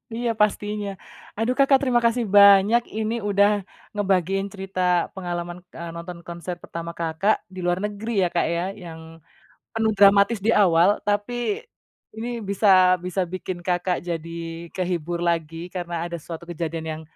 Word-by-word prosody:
Iya, 235 +1 -2
pastinya. 210 0 0 0.5
Aduh 225 +3 +1
Kakak, 275 -1 +5
terima 250 -3 +2
kasih 235 +1 +2
banyak 200 +3 +7
ini 220 +1 -1
udah 200 0 +4 0.5
ngebagiin 195 -1 0
cerita 190 -1 -6 0.4
pengalaman, 175 -1 -4
eee, 170 0 -7
nonton 170 +1 -7
konser 175 +1 -6
pertama 170 0 -6
Kakak, 170 +6 0
di 185 -1 -9
luar 175 +1 +1
negeri 210 -1 -1
ya, 175 - +1
Kak, 170 - +2
ya, 170 - -1 0.2
yang 160 -1 -9 0.7
penuh 225 -1 +1
dramatis 200 +2 +5
di 225 - +3
awal. 190 0 +4
Tapi 240 - -1 0.5
ini 225 +2 -4
bisa 190 -2 +5
bisa 180 +1 -2
bikin 185 -1 -4
Kakak 180 0 0
jadi 165 0 -6
kehibur 175 -2 -2
lagi 165 0 -1
karena 175 -2 -3
ada 170 0 -5
suatu 165 +1 -8
kejadian 165 -1 -4
yang 155 0 -6
185 Hz, 145 wpm, -23 LUFS, 170-210 Hz, 0.7 s, banyak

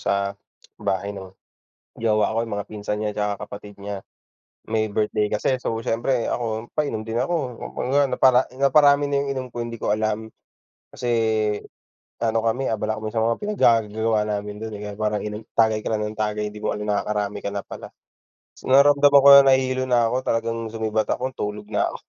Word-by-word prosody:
sa 100 0 0 0.5
bahay 100 +2 -1
ng 95 -1 -8 0.7
jowa 110 -1 +2
ko, - - 0
'yung 115 -3 -4
mga 100 - -5
pinsan 105 0 -4
niya 105 -1 -2
tsaka 105 0 -2
kapatid 100 0 -10
niya, 100 -1 -6 0.7
may 110 -1 0
birthday 105 0 0
kasi. 130 +5 +1
So 125 - -3
siyempre 115 +2 0
ako, 115 -1 -3
painom 145 -8 -1
din 115 +1 -5
ako, 130 -2 -1 0.2
'yun - - -2
nga 145 - +5
napara 130 -1 +4 0.2
naparami 145 0 +5
na 140 - 0
'yung - - -5
inom 130 -1 -4
ko, 120 -1 -5
hindi 115 -1 -7
ko 105 - +1
alam. 110 0 -2 0.6
Kasi 120 - -5 1.1
ano 115 -1 0
kami, 125 +4 0
abala 110 0 -2
kami 110 - -4
sa 110 - +2
mga 115 0 +1
pinaggagagawa 110 - +1
namin 105 0 -4
do'n, 110 -1 -5
eh, 100 - -9
kaya - - -8
parang 105 -1 -1
inom 105 0 -5 0.2
tagay 110 -1 +3
ka - - -4
na 105 -1 -1
ng 105 - -4
tagay, 105 0 -1
'di 105 - -10
mo - - -2
alam, 105 - -5
nakakarami 105 0 -1
ka - - -4
na 100 0 -4
pala. - - -9 0.8
Naramdaman 140 +1 +6
ko 140 - +7
na 140 - +9
nahilo 130 0 0
na 120 -2 +3
ko, 125 - 0
talagang 115 -2 -2
sumibat 110 -1 -1
ako, 130 +1 -3
tulog 105 0 -5
na 105 - +1
ako. - - -4
110 Hz, 190 wpm, -23 LUFS, 105-125 Hz, 1.1 s, na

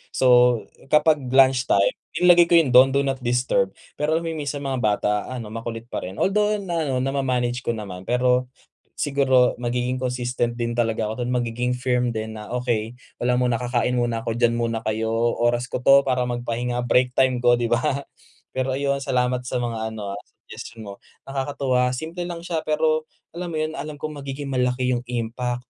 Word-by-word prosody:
So, - - +1 0.6
kapag 150 +1 +4
lunch 130 0 +4
time 100 0 +3 0.2
inilagay 175 -1 +6
ko 170 - +4
yung 160 -6 +4
do'n 130 +2 +8
do 140 0 +2
not 135 -1 -2
disturb 125 -5 +1 0.2
pero 155 +2 0
alam 170 - -4
mo 165 - -2
minsan 145 -2 -3
mga 135 -2 -2
bata 105 -1 +1 0.2
ano, 120 -4 -6
makulit 115 0 -6
pa - - -2
rin 95 +2 -7
although 210 - +2
ano, 165 -9 -2
nama-manage 130 -3 -1
ko 120 - +1
naman. 95 -4 -7
Pero 125 +1 +2 0.5
siguro 135 -3 +3
magiging 125 +1 -1
consistent 125 -1 -2
din 120 -1 -2
talaga 115 -2 0
ako 110 +3 -4
dun, 120 - -2
magiging 120 +1 -1
firm 125 -1 0
din 110 -1 -4
na, 105 -1 -9
"Okey, 120 -1 -2 0.2
wala 125 0 +2
muna. 125 -1 +1
Kakain 125 0 0
muna 120 -2 -1
ako. 115 - -1
Diyan 120 0 +2
muna 115 -1 -1
kayo. 110 0 -1 0.2
Oras 120 +1 +1
ko - - -2
'to 135 0 +8
para 130 -2 0
magpahinga, 120 0 -2
break 125 0 +3
time 130 -1 +3
ko," 120 0 +4
di 120 -1 0
ba? 120 - +3 0.8
Pero, 130 0 0
ayun, 140 +1 0
salamat 125 -2 -1
sa 125 0 -2
mga 110 -2 -3
ano, 100 -2 -5
ah, - - -9
suggestion 115 -1 -11
mo. - - -7 0.4
Nakakatuwa 135 -2 0
simple 165 +6 -5
lang 170 -1 -6
siya 170 -2 -3
pero, 155 0 +1 0.3
alam 175 -1 -4
mo - - -2
yun, 155 +1 -3
alam 155 - -5
ko 155 - -3
magiging 140 -1 -6
malaki 125 -1 0
yung 120 - -7
impact 125 +1 -3
125 Hz, 185 wpm, -23 LUFS, 120-135 Hz, 0.8 s, do'n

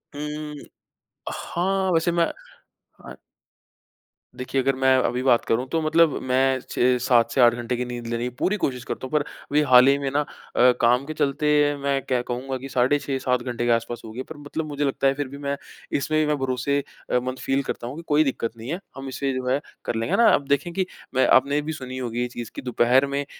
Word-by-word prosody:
हुँ। 150 +1 -5 0.8
हाँ, 190 +2 -1
वैसे 165 +1 +2
मैं 170 0 +3 0.9
आए - - -9 1.2
देखिए, 130 +1 -1
अगर 135 +1 +1
मैं 130 0 +4
अभी 125 +1 0
बात 125 -3 +3
करूँ, 120 +3 +1
तो 165 +2 0
मतलब 160 +1 +4
मैं 130 +1 +2
6-7 125 -1 +2
से 130 - +2
8 120 -1 +7
घंटे 120 +1 -3
की 125 - -2
नींद 120 -1 -6
लेनी 115 0 -2
की 125 - -1
पूरी 210 +3 +1
कोशिश 125 -3 -1
करता 130 - -5
हूँ, - - -17
पर 150 -1 +2
अभी 145 +1 -2
हाल 125 0 +8
ही 140 0 +5
में 140 -1 -2
ना 145 - +1
अ, 125 -3 +1
काम 125 +3 +3
के 155 - -5
चलते 145 -1 0 0.4
मैं 140 -1 +1
कह 125 -2 0
कहूँगा 130 +2 -3
कि 135 +2 -8
साढ़े 130 +3 +2
6-7 130 -3 -1
घंटे 120 -1 -3
के 120 - +2
आस-पास 115 0 -1
होगी, 110 +3 -6
पर 160 - -11
मतलब 145 +2 -5
मुझे 145 -1 -2
लगता 135 0 +1
है 135 - +3
फिर 145 0 -3
भी 140 +2 -9
मैं 140 0 -3 0.4
इसमें 155 +2 0
भी 155 - +3
मैं 150 0 +1
भरोसे 135 +2 0 0.3
अ, 125 - +3
मंद 130 +1 -4
फ़ील 135 +1 0
करता 120 - -5
हूँ 125 - -6
कि 165 - -7
कोई 150 +1 +4
दिक्कत 130 -5 -2
नहीं 115 +3 -8
है। 175 - -2 0.2
हम 135 0 -6
इसे 135 +1 -2
जो 130 0 -3
है 130 +2 +2 0.3
कर - - -2
लेंगे 115 +1 0
ना। 235 - +5
आप - - +3
देखें 140 +5 +1
कि 190 +1 0 0.3
मैं 130 - +4
आपने 140 +3 +4
भी 155 +2 -4
सुनी 130 -3 -7
होगी 120 -2 -3
ये 125 - 0
चीज़ 120 -2 -8
कि - - -5
दोपहर 125 +2 +3
में 140 +1 -2
135 Hz, 225 wpm, -24 LUFS, 125-145 Hz, 1.2 s, हाल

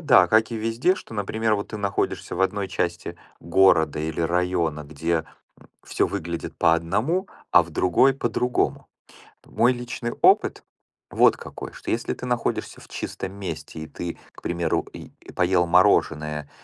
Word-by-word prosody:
да, 125 - +5
как 110 +3 +3
и - - -2
везде, 115 +11 +1
что, 185 - -11
например, 105 +1 0
вот 100 - -5
ты 105 - -6
находишься 100 -3 -2
в 95 - -3
1 100 0 0
части 85 -1 -3 0.2
города, 85 -3 +3
или 80 +1 -3
района, 85 -3 0
где, 80 +2 -2 0.3
м, - - -20 0.2
всё - - 0
выглядит 85 0 -5
по 80 - +4
одному, 110 - 0 0.2
а 85 - +7
в 85 - -12
другой 90 - +3
по-другому. 125 -1 -1 0.6
Мой 120 +2 +3
личный 120 -1 -5
опыт - - +4 0.5
вот - - +4
какой: - - -9
что - - -7
если 115 +1 -1
ты 125 - -7
находишься 120 -1 -2
в - - -15
чистом 95 - -5
месте 100 -4 -6
и 80 - -6
ты, 85 +1 -6
к - - -16
примеру, 85 -2 -1
и - - -10 0.2
поел 90 -1 +2
мороженое, 75 -5 +2
90 Hz, 160 wpm, -24 LUFS, 85-115 Hz, 0.6 s, а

